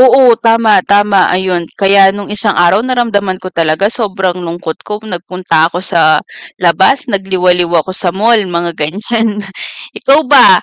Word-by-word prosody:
Oo 260 +1 +5 0.2
tama, 225 -1 +3 0.2
tama 205 -1 +3 0.2
ayun 185 -2 -2 0.2
kaya 195 0 +4
nung 205 0 -7
isang 205 0 +1
araw 190 +4 +2
naramdaman 220 -7 -2
ko 185 - -6
talaga 160 +5 +1
sobrang 195 -5 -2
lungkot 165 -1 -6
ko, 210 - -3 0.2
nagpunta 180 0 -4
ako 175 - -5
sa 165 - +2 0.6
labas, 190 +9 +3
nagliwaliw 180 -3 0
ako 185 - -8
sa 180 - 0
mall 230 +3 +3 0.2
mga 170 0 -2
ganyan. 215 +8 -2 0.7
Ikaw 275 +3 +3
ba? 265 -3 +7
195 Hz, 145 wpm, -11 LUFS, 180-220 Hz, 0.7 s, ba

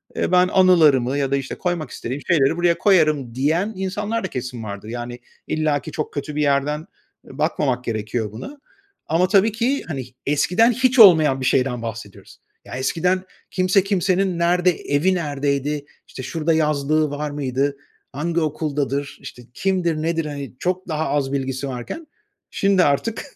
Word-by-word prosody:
Ben 180 0 +3
anılarımı 155 -9 +4
ya 140 -1 -1
da, - - +3
işte, 135 -1 -4
koymak 175 -6 -2
istediğim 130 +4 -5
şeyleri 160 -2 +3
buraya 175 -1 +2
koyarım." 155 - +2
diyen 165 +11 0
insanlar 205 +4 -3
da - - -1
kesin 125 -5 -6
vardır. 100 0 -7
Yani 120 +1 -6 0.3
illaki 155 -1 -1
çok 155 - -4
kötü 145 +1 -5
bir 150 - 0
yerden, 145 +1 +1 0.5
eee, - - -13
bakmamak 125 -3 0
gerekiyor 110 -1 -3
buna. 275 - -9 0.5
Ama 170 +4 +2
tabii 200 +3 +4
ki, 245 +6 -1
hani, 135 -6 -4 0.2
eskiden 180 - +3
hiç 255 +1 +1
olmayan 155 -10 +7
bir - - -2
şeyden 125 -2 +1
bahsediyoruz. 115 -3 -8 0.3
Ya, - - -8
eskiden 180 +8 0 0.3
kimse 185 +1 +2
kimsenin 190 -2 0
nerede 175 +1 +3
evi 160 +3 0
neredeydi, 145 -2 -2 0.2
işte, 130 - -8
şurada 165 +3 -1
yazlığı 155 -1 +1
var 145 +1 -3
mıydı, 140 0 -1 0.4
hangi 165 +4 -1
okuldadır, 145 -2 -2
işte, 125 - -10
kimdir 180 -1 0
nedir? 165 0 -1
Hani, 140 -3 -6
çok 185 +1 -2
daha 160 -2 -2
az 140 -1 0
bilgisi 135 0 -2
varken 135 - -6 0.4
şimdi 195 -2 +3
artık 145 +11 0
150 Hz, 155 wpm, -21 LUFS, 135-180 Hz, 0.5 s, olmayan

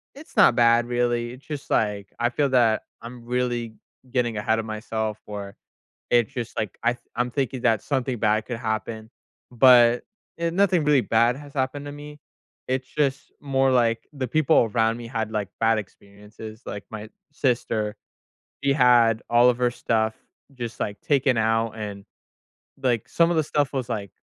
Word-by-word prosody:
it's 290 +3 -14
not - - +6
bad, 120 0 +4
really, 120 -1 0
it's 130 +2 -15
just, 150 -2 -7
like, 105 -2 0
I 120 0 +2
feel 140 +3 0
that 120 -4 +3 0.2
I'm 120 0 -9
really 120 -2 -2 0.4
getting 120 -3 0
ahead 110 +2 +1
of 110 - -4
myself, 110 0 -4
or 100 -1 -7 0.6
it's 120 +1 +3
just, 120 -3 -5
like, 105 -4 -3
I 120 +1 +3
th 120 - -17
I'm 120 +1 -1
thinking 135 -2 -2
that 110 -2 +2
something 130 -4 -2
bad 105 0 +1
could 120 - -4
happen, 110 -1 -4 0.4
but, 120 -1 +6 0.3
eh, 170 0 -1
nothing 185 -2 +2
really 145 -2 +4
bad 115 +1 +2
has 145 0 -12
happened 140 +2 -2
to - - -6
me. 150 +1 -10 0.5
It's 130 0 -1
just 135 -1 -1
more 135 -2 +1
like 115 -2 +1
the 135 -4 -4
people 130 -4 +3
around 115 0 +2
me 120 -1 -8
had, 110 -2 -3
like, 105 -2 -2
bad 115 0 +3
experiences, 105 +2 -11
like, 100 - -6
my 110 0 -7 0.2
sister, 115 -6 -1 0.7
she 140 - +4
had 120 -4 +4
all 120 +1 +6
of 120 - -3
her 125 -1 +2
stuff 110 -2 0 0.4
just, 120 -3 -6
like, 100 0 -3
taken 135 -4 +2
out, 115 0 +1
and, 100 -2 -6 0.8
like, 120 -5 +1
some 170 0 +3
of 170 - +1
the 160 - +2
stuff 145 -2 0
was, 130 -3 -2
like, 100 -4 -3
120 Hz, 175 wpm, -24 LUFS, 110-130 Hz, 0.8 s, not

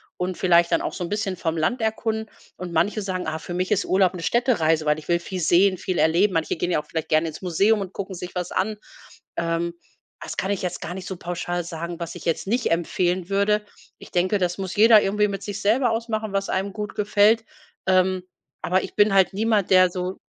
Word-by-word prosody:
und 180 0 -3
vielleicht 175 -2 +4
dann - - +2
auch - - -3
so - - -4
'n 170 - -4
bisschen 205 -2 -2
vom 165 -2 -2
Land 230 +11 0
erkunden.“ 220 0 -2 0.3
Und 180 -1 -7
manche 175 +6 +1
sagen: 185 -3 -3
„Ah, 160 0 -3
für 175 - -7
mich 185 +2 -2
ist 205 -1 +2
Urlaub 190 -1 +2
'ne 175 -2 -7
Städtereise, 165 -11 +2
weil 150 0 +2
ich 155 - -15
will 170 0 +3
viel 180 +1 -5
sehen, 185 +3 +4
viel 185 0 -3
erleben.“ 175 +5 +3
Manche 165 -1 0
gehen 175 +2 -2
ja - - +2
auch - - -25
vielleicht 160 -1 -4
gern 155 +1 +3
ins 160 - -6
Museum 200 +4 +2
und 190 -2 -5
gucken 195 -1 -6
sich 180 +1 -8
was 180 -1 -3
an. 210 +3 -1 0.6
Ähm. 170 0 -1 0.5
Das - - -7
kann 190 - -1
ich 200 - -1
jetzt 180 -1 -3
gar 175 - -5
nicht 190 0 -7
so 190 - -4
pauschal 175 0 -3
sagen, 170 0 -6
was 170 0 -5
ich - - -10
jetzt 165 +3 -1
nicht 240 -3 +1
empfehlen 175 +1 0
würde. 200 +1 +1 0.3
Ich - - -13
denke, 185 +3 +1
das 180 -1 -1
muss 190 -1 -4
jeder 220 +1 +7
irgendwie 210 +1 +1
mit 200 -1 -5
sich 205 0 -5
selber 235 +4 +3
ausmachen, 225 -2 -2
was 195 -1 -1
einem 195 +1 -1
gut 210 -1 -5
gefällt. 210 +2 +3 0.4
Ähm. 185 0 +2 0.4
Aber 185 +2 +1
ich - - -8
bin 205 -1 +4
halt 190 -1 +4
niemand, 215 -1 +1
der 185 -1 +6
so 180 +1 -4
185 Hz, 230 wpm, -23 LUFS, 175-205 Hz, 0.6 s, jeder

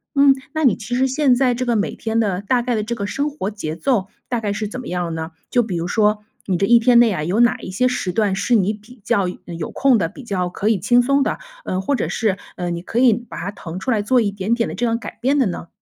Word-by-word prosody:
嗯， 280 0 +6 0.2
那 315 - -1
你 235 - +5
其 235 +2 -4
实 260 +1 +2
现 265 -1 +3
在 250 -1 +2
这 255 +1 -2
个， 240 - +1
每 210 -1 0
天 225 0 -1
的 200 -4 0
大 240 +5 +1
概 245 0 -1
的 215 -2 0
这 235 +3 -3
个 200 -3 -3
生 280 +8 -1
活 245 -9 -4
节 160 -7 -5
奏， 215 -1 0 0.2
大 240 - -1
概 210 -2 -2
是 215 0 -3
怎 235 +5 -6
么 255 - -8
样 175 -2 -2
呢？ 160 +1 -5 0.2
就 245 - +3
比 215 -6 -3
如 170 +1 -2
说 210 +2 +2 0.2
你 185 -3 +1
这 195 - +2
一 235 +1 +6
天 235 0 +5
内 235 -2 +5
啊， 155 -6 -2
有 180 +8 0
哪 240 - +4
一 - - -8
些 230 +7 +1
时 220 -7 -1
段 200 0 +1
是 235 +5 +1
你 205 -1 +2
比 220 +3 -15
较 210 -5 +1 0.2
嗯， 170 -1 -7
有 160 - -5
空 270 -3 +3
的？ 175 -6 0
比 260 - -12
较 185 -6 -2
可 200 - -3
以 220 -3 +3
轻 245 +6 +4
松 275 +3 +2
的？ - - 0 0.3
嗯， 185 +1 -2
或 280 +7 0
者 - - -2
是， 205 -4 0 0.2
嗯， 175 -1 -3
你 170 - -5
可 220 - -5
以 250 -3 +6
把 240 +2 -7
它 190 +3 -4
腾 175 -3 -7
出 255 - -2
来 220 -3 +2
做 245 +5 +3
一 205 -4 +1
点 200 +3 -1
点 235 -1 0
的 - - -5
这 245 - -1
样 230 -1 +1
改 220 -3 -9
变 275 +4 +2
的 265 - +3
呢？ 175 -3 -4
220 Hz, 315 characters per minute, -20 LUFS, 190-245 Hz, 0.3 s, 嗯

